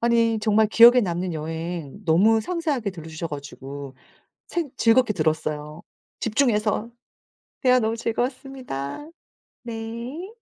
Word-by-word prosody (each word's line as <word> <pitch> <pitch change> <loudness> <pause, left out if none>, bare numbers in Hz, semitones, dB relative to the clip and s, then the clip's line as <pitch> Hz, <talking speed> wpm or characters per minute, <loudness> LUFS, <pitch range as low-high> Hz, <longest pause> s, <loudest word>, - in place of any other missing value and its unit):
아니 230 -1 +3
정말 215 0 +3
기억에 240 +3 +8
남는 180 -3 -2
여행 165 +3 -5
너무 200 +7 +4
상세하게 290 - -2
들려주셔 165 -2 -7
가지고 140 -1 -8 0.5
생 335 -4 -2
즐겁게 230 0 +4
들었어요, 155 -2 -2 0.4
집중해서. 220 -2 +1 0.7
대화 255 -1 +5
너무 225 0 0
즐거웠습니다. 250 - -4 0.6
네. 235 - -6
220 Hz, 270 characters per minute, -24 LUFS, 160-240 Hz, 0.7 s, 기억에